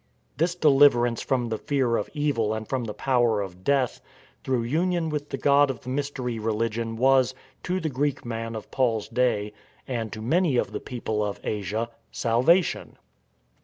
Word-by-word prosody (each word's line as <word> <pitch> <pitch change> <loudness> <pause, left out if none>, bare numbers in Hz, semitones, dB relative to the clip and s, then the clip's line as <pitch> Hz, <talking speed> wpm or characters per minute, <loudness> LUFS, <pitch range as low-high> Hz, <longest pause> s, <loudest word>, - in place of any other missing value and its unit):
This 170 +3 +1
deliverance 135 -7 +4
from 125 -3 0
the 110 - -2
fear 130 -5 +1
of 105 - -2
evil 130 -8 0
and 110 -1 -5
from 130 -3 -2
the 105 - -5
power 120 -5 +2
of 95 -2 -6
death 135 -1 +1 0.4
through 130 -3 0
union 165 +6 0
with 150 -1 -3
the - - -3
god 140 +1 +4
of 130 - -4
the 125 - -8
mystery 130 -4 -3
religion 115 +1 -1
was, 130 +1 +3 0.3
to 180 +1 -1
the 165 - -2
Greek 145 -1 -1
man 115 -1 -4
of 110 - -8
Paul's 115 -5 +1
day, 115 -3 0 0.3
and 115 -4 -3
to 110 - -7
many 150 +4 +2
of - - 0
the - - -4
people 110 -4 -3
of 105 -1 -3
Asia, 105 +2 -2 0.2
" - - -42
salvation." 130 +10 +2
125 Hz, 175 wpm, -25 LUFS, 115-140 Hz, 0.4 s, deliverance